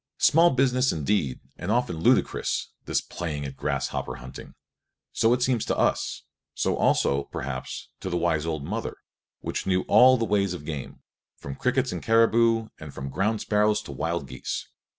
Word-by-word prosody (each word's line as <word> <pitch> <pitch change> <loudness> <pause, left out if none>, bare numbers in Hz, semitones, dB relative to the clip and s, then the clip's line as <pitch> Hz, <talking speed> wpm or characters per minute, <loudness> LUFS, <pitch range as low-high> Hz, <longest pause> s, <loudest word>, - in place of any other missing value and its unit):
Small 165 +3 +5
business 130 -1 +2
indeed 75 -3 -1 0.2
and 85 - -5
often 115 -6 +1
ludicrous, 80 - +1 0.2
this - - 0
playing 75 -5 -5
at 65 -1 -6
grasshopper 70 -2 -2
hunting. 65 +1 -10 0.6
So 115 - +3
it 125 0 +2
seems 125 -4 +1
to - - -1
us; - - 0 0.3
so - - 0
also, 70 0 +2
perhaps, 65 -1 -6
to 95 - -5
the 90 - -1
wise 85 -2 0
old 80 -3 -2
mother, 110 +7 -4 0.4
which - - -4
knew 95 -1 +2
all 130 +1 +6
the 115 - 0
ways 100 -3 +1
of 75 - -9
game, 75 -4 -6 0.3
from 70 - -7
crickets - - 0
to - - -3
caribou 115 0 +3
and 75 -2 -8
from 70 0 -5
ground 105 +8 0
sparrows 105 0 +2
to - - -8
wild 80 +2 -2
geese. - - -5
90 Hz, 170 wpm, -26 LUFS, 75-115 Hz, 0.6 s, all